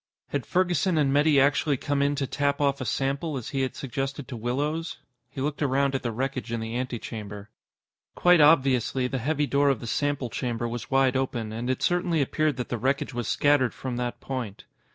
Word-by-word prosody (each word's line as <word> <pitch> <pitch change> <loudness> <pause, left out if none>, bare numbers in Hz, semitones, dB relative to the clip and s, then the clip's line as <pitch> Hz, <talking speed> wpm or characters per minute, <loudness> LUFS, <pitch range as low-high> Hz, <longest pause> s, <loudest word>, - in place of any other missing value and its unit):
Had 140 -3 -3
Ferguson 180 -1 +1
and 140 -3 +2
Metty 145 0 +4
actually 145 +1 +3
come 140 +2 -1
in 140 +1 +2
to 140 - -1
tap 140 +1 0
off 140 -2 +1
a - - -2
sample, 140 +6 -1
as 125 - -6
he 135 -2 -1
had 130 - -2
suggested 135 +1 -4
to 135 - -6
Willows? 145 +8 -2 0.3
He 135 - -6
looked 145 +2 -2
around 140 -1 +2
at 135 - -1
the 120 - -2
wreckage 130 0 -3
in 115 - -1
the 110 +1 -4
antechamber. 110 -4 -5 0.6
Quite 175 -2 +5
obviously, 135 -4 +4
the 130 +1 -2
heavy 150 +4 0
door 140 0 +2
of 135 -5 +1
the - - -8
sample 140 0 -1
chamber 120 -1 -2
was 120 0 -5
wide 135 -1 +3
open, 120 -4 -1
and 115 +3 -4
it 130 - -1
certainly 175 -2 +1
appeared 150 0 +1
that 125 - -4
the 120 - -2
wreckage 135 +3 0
was 120 -2 -3
scattered 145 -4 +2
from 130 -2 -4
that 120 -1 -3
point. 125 -7 -5
135 Hz, 205 wpm, -26 LUFS, 120-145 Hz, 0.6 s, Quite